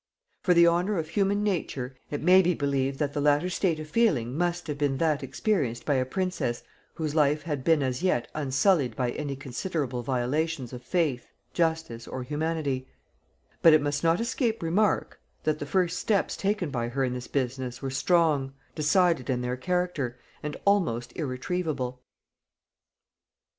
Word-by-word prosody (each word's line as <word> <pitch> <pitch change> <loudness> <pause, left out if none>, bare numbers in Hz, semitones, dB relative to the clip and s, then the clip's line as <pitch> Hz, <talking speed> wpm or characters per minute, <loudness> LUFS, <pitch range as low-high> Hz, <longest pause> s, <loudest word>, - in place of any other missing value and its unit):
For 180 - +3
the 170 0 +7
honor 175 +4 +2
of 160 -1 -2
human 200 +2 +1
nature, 140 -10 -2
it 145 - -4
may 185 +2 +7
be 180 -1 +1
believed 140 -2 0
that 145 -1 -1
the 145 - -1
latter 150 +5 +3
state 175 -4 0
of 155 - -6
feeling 150 - +1
must 175 +1 -1
have 145 -2 -4
been 140 -2 +1
that 155 -3 +1
experienced 135 - -1
by 145 - +2
a 130 -1 +1
princess 150 -7 -2 0.3
whose 155 -2 -2
life 150 -1 +2
had 145 -5 -3
been 160 -2 +3
as 130 +1 -2
yet 180 -10 +1
unsullied 140 - +2
by 125 -1 0
any 145 0 -4
considerable 135 -1 -3
violations 130 +3 -1
of 125 - -7
faith, 145 -3 -1 0.2
justice, 160 -9 -1
or 130 - -5
humanity: 145 -2 -2 0.7
but 165 - +8
it 155 - +7
must 145 +1 -1
not 165 +2 +3
escape 235 -3 -1
remark, 195 +5 +1 0.2
that 155 -1 0
the 145 - -5
first 180 +2 +1
steps 205 -3 +1
taken 195 -6 -1
by 120 -2 -1
her 135 +3 -1
in 125 -1 0
this 125 0 -6
business 130 -2 -2
were 135 - -2
strong, 145 -2 +2 0.2
decided 160 -2 +2
in 125 -2 0
their 125 0 -2
character, 175 -4 -1 0.2
and 150 -1 -4
almost 170 - +1
irretrievable. 130 -2 -3
150 Hz, 165 wpm, -27 LUFS, 130-175 Hz, 0.7 s, but